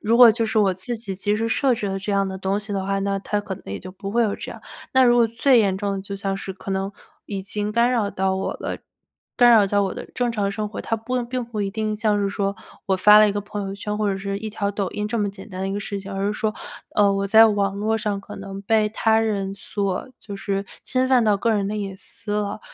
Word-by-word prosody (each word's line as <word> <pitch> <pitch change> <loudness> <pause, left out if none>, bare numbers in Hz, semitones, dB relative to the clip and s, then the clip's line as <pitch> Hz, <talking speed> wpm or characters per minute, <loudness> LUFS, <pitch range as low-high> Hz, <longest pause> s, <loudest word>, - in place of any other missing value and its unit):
如 225 +2 +2
果 240 -2 +10
就 225 0 0
是 220 0 +1
我 195 -3 +4
自 230 +6 -4
己 210 -4 -6
及 205 +2 0
时 225 +1 -1
设 250 +2 +2
置 205 -3 -3
了 195 0 -2
这 195 +2 -4
样 195 0 +2
的 190 - -5
东 190 +2 0
西 205 0 -6
的 195 -1 -1
话， 195 0 0
那 195 0 0
他 210 +1 -2
可 195 -2 -5
能 - - -16
也 95 0 -4
就 185 - -9
不 195 +1 -6
会 235 +2 +2
有 210 -3 +1
这 - - -7
样。 - - -12 0.3
那 260 0 +5
如 240 0 +5
果 235 -1 +5
最 240 +3 +3
严 195 -3 +2
重 200 0 -2
的 195 - -3
就 200 0 -6
像 195 0 -2
是 195 0 -6
可 195 - -8
能 195 +1 -1 0.4
已 195 -2 -4
经 210 +1 -2
干 235 +2 +3
扰 215 -5 +1
到 190 0 0
我 190 - -2
了， - - -5 0.6
干 245 -1 +7
扰 215 -4 +6
到 205 +1 +2
我 190 - -2
的 - - -7
正 245 -1 0
常 200 -2 -1
生 210 0 -3
活， - - -6
它 225 - -1
不 245 +3 -2
并 250 +1 -3
不 225 -3 -5
一 195 - -2
定 215 0 -2
像 210 -2 +1
是 200 - +1
说 200 0 -1 0.3
我 190 - +2
发 210 +3 +8
了 215 - +7
一 - - 0
个 205 - -2
朋 205 -1 -5
友 195 - -4
圈 210 +1 -4
或 210 -1 +1
者 195 - -3
是 200 0 -3
一 215 +1 -5
条 205 -1 -1
抖 200 -3 -2
音 210 0 -3
这 230 0 -1
么 205 -1 0
简 195 +1 -12
单 185 -1 -7
的 195 - -1
一 - - -2
个 205 - -2
事 200 -1 -4
情， 195 0 -8
而 195 +1 -1
是 205 - 0
说， 215 0 -1 0.4
呃， 205 -1 +5
我 195 0 0
在 220 +3 +8
网 200 -2 +1
络 220 +2 +1
上 210 -2 -2
可 - - -10
能 195 0 -7
被 215 0 +2
他 220 0 +2
人 200 -3 -1
所 200 +3 -3
就 200 -2 -8
是 195 0 -2 0.2
侵 255 0 +1
犯 250 -3 +4
到 210 -2 +4
个 230 - +1
人 200 -2 +1
的 210 - -3
隐 195 -2 -4
私 220 +1 -8
了。 205 -1 -3
205 Hz, 310 characters per minute, -23 LUFS, 195-220 Hz, 0.6 s, 果